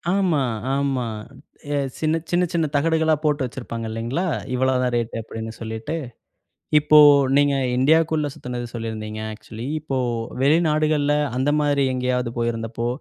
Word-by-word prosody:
ஆமா, 175 -8 +2 0.3
ஆமா. 135 -3 0 0.9
சின்ன, 155 0 +1
சின்ன, 180 +1 +2
சின்ன 165 -2 +1
தகடுகளா 160 +1 +2
போட்டு 145 -2 +1
வச்சிருப்பாங்க 115 -2 -6
இல்லைங்களா? 120 +11 -2 0.3
இவ்வளோ 130 +1 +2
தான் 125 -1 0
ரேட் 115 -1 -3
அப்டின்னு 110 0 -7
சொல்லிட்டு 110 +7 -4 0.8
இப்போ 150 0 +5 0.4
நீங்க 145 -1 +3 0.2
இந்தியாவுக்குள்ள 155 +2 +3
சுத்துனது 125 -1 -5
சொல்லியிருந்தீங்க 110 -2 -5
ஆக்சுவலி 110 +2 -9
இப்போ 140 -3 -3 0.4
வெளிநாடுகள்ல 150 -1 +2 0.2
அந்த 130 +3 +1
மாரி 145 -1 +2
எங்கேயாவது 125 -1 -1
போயிருந்தப்போ 115 0 -2
135 Hz, 120 wpm, -22 LUFS, 115-155 Hz, 0.9 s, இப்போ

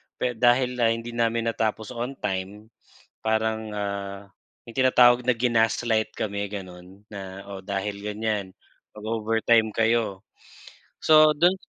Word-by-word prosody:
pero 125 - -1
dahil, 125 +1 +2
ah, 115 - +4
hindi 115 +1 -2
namin 115 0 0
natapos 110 +1 -2
on 125 +3 -4
time, 100 +3 -5 0.5
parang 110 0 -1
ah, 100 -1 -5 0.4
may 115 - -11
tinatawag 125 -1 +5
na 125 - +3
ginaslight 115 -1 +1
kami 100 -1 -3
gano'n, 95 -1 -9
na, 100 -1 -9
"O, 95 -1 -8
dahil 100 +1 -3
ganyan 105 -2 -2 0.4
mag-overtime 110 +1 +1
kayo," 115 -4 +1 0.8
so 155 -1 +6
don 175 +3 +5
110 Hz, 125 wpm, -25 LUFS, 100-120 Hz, 0.8 s, so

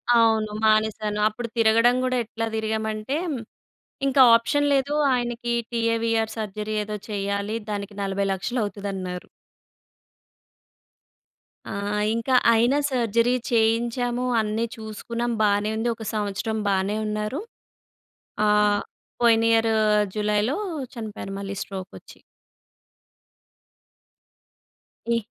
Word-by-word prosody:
అవును 220 -2 +3
మానేసాను. 215 -1 +2
అప్పుడు 235 +3 -4
తిరగడం 230 +2 +4
కూడా 255 0 +1
ఎట్లా 225 +1 -4
తిరిగామంటే, 220 +3 -2 0.9
ఇంకా 270 0 +4
ఆప్షన్ 290 +5 +1
లేదు. 275 +1 +1 0.2
ఆయనకి 240 -1 -2 0.2
టీఏవీఆర్ 230 -1 0
సర్జరీ 215 0 -4
ఏదో 210 0 -5
చేయాలి, 200 +1 -2 0.2
దానికి 205 0 -4
40,00,000 195 +4 -1
అవుతదన్నారు. 195 -3 -5 2.4
ఆ! - - -7 0.4
ఇంక 230 +2 -4 0.2
అయినా 240 +5 +3
సర్జరీ 235 -1 +2 0.2
చేయించాము. 235 +2 +1 0.2
అన్నీ 215 +2 -1
చూసుకున్నాం, 230 +2 -4
బానే 205 +1 +2
ఉంది. 230 +2 0
ఒక 220 - -9
సంవత్సరం 210 +1 -2
బానే 195 +2 0
ఉన్నారు. 215 - -2 1.0
ఆ! - - +3 0.7
పోయినియరూ 225 -1 +4 0.4
జులైలో 210 +4 +1 0.4
చనిపోయారు 220 -4 -6
మళ్ళీ 200 0 -5
స్ట్రోకొచ్చి. 190 -2 -8 2.9
ఏ 235 0 +1
220 Hz, 90 wpm, -24 LUFS, 210-235 Hz, 2.9 s, తిరగడం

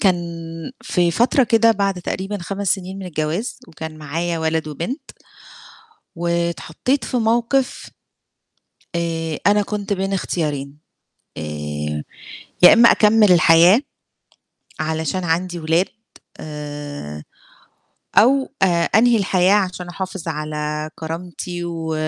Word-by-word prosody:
كان 190 -3 +4 0.7
في 175 -1 +1
فترة 245 - +3
كده 230 -1 +4
بعد 195 -3 -1
تقريبًا 195 +3 -3
5 195 +3 -4
سنين 190 0 -8
من 190 - -6
الجواز 160 +7 -3
وكان 160 0 -8
معايا 165 +3 -2
ولد 160 -1 -1
وبنت 170 - -5 1.1
واتحطيت 170 - -1
في 255 - -2
موقف 235 +4 0 1.0
آآ 165 -2 -2
أنا 205 0 +5
كنت 205 0 -3
بين 195 0 -1
اختيارين، 150 -6 -2 0.6
آآ 75 0 -4 0.6
يا - - +10
إمّا 235 +1 +7
أكمِّل 210 -2 +5
الحياة 170 +5 +6 1.0
علشان 160 +3 -2
عندي 175 +1 -1
ولاد 165 +3 +2 0.5
آآ 145 - -7 0.9
أو 265 +4 +5
آآ - - +7 0.2
أنهي 235 +3 +4
الحياة 190 -1 +3
عشان 180 -3 -1
أحافظ 185 -1 -5
على 150 0 -3
كرامتي 175 +2 -6
و 165 -2 -3
175 Hz, 110 wpm, -20 LUFS, 155-200 Hz, 1.1 s, يا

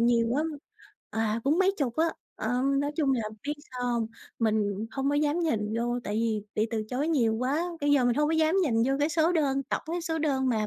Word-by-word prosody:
nhiều 235 0 +3
quá. 285 +6 +1 0.7
À, 220 0 0
cũng 295 +5 +3
mấy 380 +1 +4
chục 250 -5 -1
á. 325 +1 +3 0.3
Ờ, 245 +3 0 0.2
nói 285 +1 -1
chung 285 -4 +2
là 245 -3 0 0.2
biết 295 - 0 0.2
sao 250 -1 -3
hông? 230 -2 0 0.3
Mình 215 -2 0
hông 270 +2 -1
có - - +1
dám 295 +3 +1
nhìn 220 -10 0
vô 240 +1 0
tại 205 - -3
vì 220 -2 0
bị 215 +1 +1
từ 220 -2 -1
chối 270 +5 -1
nhiều 235 -9 +2
quá, 265 +8 0 0.2
bây 290 0 +1
giờ 270 -3 +4
mình 245 -1 +3
hông 295 +3 +2
có - - +1
dám 320 +1 +3
nhìn 275 -10 +1
vô 270 - +2
cái 295 - +3
số 325 +1 +2
đơn 275 -5 +1
tổng 270 - -3
cái 340 +2 -2
số 320 0 -2
đơn 270 -4 +1
mà 215 -3 +1
265 Hz, 240 wpm, -28 LUFS, 230-300 Hz, 0.7 s, mấy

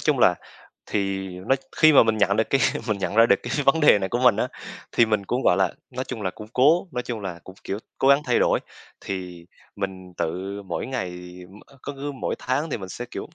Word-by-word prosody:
chung - - +1
là, - - +5 0.5
thì 95 -2 -2 0.2
nó 135 - +5 0.2
khi 155 -1 +6
mà - - +8
mình 110 -1 +1
nhận 100 0 +3
được 110 - 0
cái 135 - +3 0.3
mình 105 -2 0
nhận 95 - -3
ra 115 +1 +6
được 100 - +5
cái 120 - -5
vấn 135 +4 +4
đề 150 -8 +6
này 95 - -2
của 120 - -1
mình 125 -4 +5
á, 125 - 0 0.4
thì 115 - +4
mình 105 -2 0
cũng, 125 +5 -1
gọi 90 - +4
là, 95 -2 +2 0.2
nói 130 +1 -4
chung 115 -5 -6
là 95 - -1
cũng 105 +2 -11
cố 155 +9 +4
nói 125 - -2
chung 120 -3 -5
là 90 -4 -6
cũng, 95 - -12
kiểu, 100 - -3 0.2
cố 135 - +3
gắng 140 +2 +5
thay 125 - +2
đổi. - - +2 0.4
Thì 90 -3 -6 0.3
mình 95 -2 -5
tự 95 +5 -3
mỗi 90 -3 -4
ngày 125 -9 -3 0.4
m 100 +2 -15 0.2
cứ 145 - -5
cứ 145 +1 -4
mỗi 135 - -3
tháng 130 +7 -1
thì - - -1
mình 95 - -8
sẽ, 120 +7 -6
kiểu - - -6
105 Hz, 245 wpm, -24 LUFS, 95-130 Hz, 0.5 s, mà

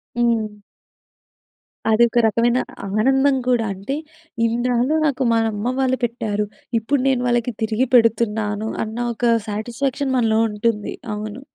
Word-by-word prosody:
హ్మ్. 225 -3 0 1.3
అది 220 +2 +5
ఒక 240 - +2
రకమైన 235 +3 +2 0.3
ఆనందం 270 +7 +3
కూడా. 240 -3 +2
అంటే 200 +9 -4 0.5
ఇన్నాళ్ళు 245 +4 +1
నాకు 275 -2 0
మన 225 0 +3
అమ్మ 230 +5 -2
వాళ్ళు 260 -1 +2
పెట్టారు. 215 -3 -1 0.3
ఇప్పుడు 255 +4 0
నేను 260 -2 +2
వాళ్ళకి 240 0 0
తిరిగి 220 +4 +1
పెడుతున్నాను 220 -2 +2
అన్న 220 +1 -6 0.2
ఒక 235 0 +2
సాటిస్ఫ్యాక్షన్ 255 +6 -2
మనలో 225 -2 +2
ఉంటుంది. 210 0 -1 0.2
అవును. 215 +3 -6
235 Hz, 125 wpm, -21 LUFS, 215-250 Hz, 1.3 s, అది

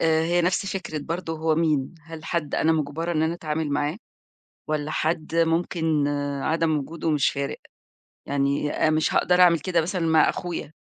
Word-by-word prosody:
آآ، 160 0 +3
هي 175 +1 +2
نفس 180 +2 +1
فكرة 190 -5 -4
برضه 165 +1 -4
هو 160 0 +1
مين، 155 -2 0
هل 160 0 -10
حد 165 -4 -2
أنا 160 - +3
مجّبرة 160 +3 -2
إن 155 -1 +1
أنا 160 +1 0
أتعامِل 155 -2 -3
معاه 145 +4 -1 0.7
والّا 155 0 -1
حد 160 +1 -1
ممكن 165 -2 +1
آآ، 145 -1 -2
عدم 160 -1 +1
وجوده 160 +3 -3
مش 145 -3 +2
فارق، 140 0 -3 0.7
يعني 140 +1 0
أ - - +1
مش 155 0 +1
هاقدر 180 0 +3
أعمِل 170 -2 +6
كده 175 0 +1
مثلًا 180 +2 -2
مع 160 -1 +5
أخويا 175 -4 -4
160 Hz, 175 wpm, -24 LUFS, 150-165 Hz, 0.7 s, أعمِل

